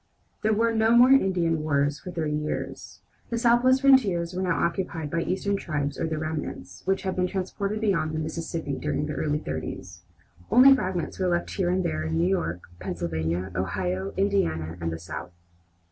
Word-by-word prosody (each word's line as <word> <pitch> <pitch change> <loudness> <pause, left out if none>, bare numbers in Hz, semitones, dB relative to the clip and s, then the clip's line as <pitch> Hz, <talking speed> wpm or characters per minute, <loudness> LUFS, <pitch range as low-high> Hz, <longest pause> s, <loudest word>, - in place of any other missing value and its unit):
There 215 - +2
were 230 +2 +2
no 225 +1 +4
more 250 +2 +7
Indian 180 - +3
wars 145 -1 +1
for - - -9
thirty 160 -4 -2
years. 150 0 -4 0.3
The 235 - -1
Southwest 240 +2 +4
frontiers 200 -11 +4
were 185 - -2
now 180 -4 +1
occupied 170 -4 -3
by 170 - 0
eastern 200 +3 -1
tribes 145 -5 -3
or - - 0
their 160 -1 -2
remnants, 155 -1 -5
which 195 0 0
had 190 -1 -2
been 180 0 +1
transported 200 +3 -3
beyond 190 -7 +1
the 155 - -3
Mississippi 160 -2 -4
during 150 0 -1
the 150 - -4
early 150 -1 0
thirties. 90 - -6 0.5
Only 270 +2 +8
fragments 185 - -2
were 185 - +1
left 175 -1 0
here 185 -4 0
and 185 +1 +1
there, 75 - -1
in 80 +1 -1
New 85 - +2
York, 90 -2 -1 0.2
Pennsylvania, 85 +2 -3
Ohio, 95 +1 -2
Indiana, 80 - 0
and 85 0 -1
the 80 - -4
South. 85 +1 -7
165 Hz, 180 wpm, -26 LUFS, -, 0.5 s, Only